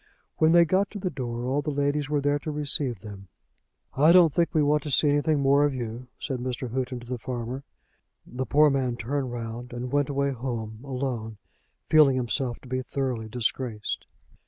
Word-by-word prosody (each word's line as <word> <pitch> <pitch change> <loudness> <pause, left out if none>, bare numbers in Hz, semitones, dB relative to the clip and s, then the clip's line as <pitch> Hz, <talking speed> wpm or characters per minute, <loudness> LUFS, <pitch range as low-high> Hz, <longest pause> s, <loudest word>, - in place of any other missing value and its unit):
When 160 0 +4
they 170 0 +7
got 190 +4 +2
to 215 - -7
the 185 -1 -2
door 120 -2 -4
all 135 +3 0
the 150 - -3
ladies 145 0 0
were 150 -1 +1
there 145 +1 +1
to 155 - -6
receive 145 - 0
them. 100 -2 -10 0.7
"I 150 +5 +5
don't 170 -4 +6
think 170 -1 +2
we 155 -3 +2
want 150 +1 +3
to 150 - -6
see 145 +2 +3
anything 145 +1 +2
more 140 +1 +4
of 145 -2 +1
you," 120 0 -5
said 135 -4 -4
Mr. 125 0 -4
Houghton 130 -1 -2
to 120 - -12
the 125 -1 -4
farmer. 125 +2 -5 0.6
The 130 +2 -5
poor 150 0 +5
man 130 -3 0
turned 130 +2 -2
round 120 +1 -6
and 125 +1 -5
went 145 -1 +1
away 140 0 0
home, 115 -4 -5
alone, 125 -5 -4 0.5
feeling 150 -4 +6
himself 125 0 -1
to - - -14
be 130 +1 -2
thoroughly 130 -4 -3
disgraced. 115 -1 -3
130 Hz, 195 wpm, -26 LUFS, 120-145 Hz, 0.7 s, they